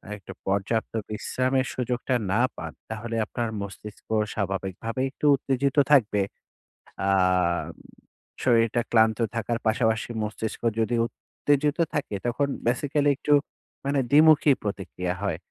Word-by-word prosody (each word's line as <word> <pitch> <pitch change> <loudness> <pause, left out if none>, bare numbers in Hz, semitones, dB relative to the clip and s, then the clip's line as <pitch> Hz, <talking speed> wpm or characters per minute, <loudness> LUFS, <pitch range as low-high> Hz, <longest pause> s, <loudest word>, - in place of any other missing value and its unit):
একটু 100 -1 -11 0.2
পর্যাপ্ত 100 +3 0 0.2
বিশ্রামের 130 +4 0
সুযোগটা 125 +1 -1 0.2
না 105 - +2 0.2
পান। - - -7 0.2
তাহলে 115 +1 -4
আপনার 115 +1 -3
মস্তিষ্ক 100 +1 -9 0.3
স্বাভাবিকভাবে 95 +4 -3
একটু 145 - -5
উত্তেজিত 135 0 -1 0.2
থাকবে। 110 -8 +4 0.9
আ - - +3 1.3
শরীরটা 115 -1 +3
ক্লান্ত 110 -1 +4 0.2
থাকার 115 +1 -1
পাশাপাশি 110 0 +1
মস্তিষ্ক 110 +1 -4 0.2
যদি 115 +2 +1
উত্তেজিত 145 +3 -1 0.2
থাকে 140 -8 -2
তখন 125 +4 +1 0.2
basically 145 +4 +1
একটু 150 - +1 0.5
মানে 140 0 +1
দ্বিমুখী 155 0 +6
প্রতিক্রিয়া 90 -3 -3
হয়। 95 -6 -1
115 Hz, 110 wpm, -26 LUFS, 105-135 Hz, 1.3 s, দ্বিমুখী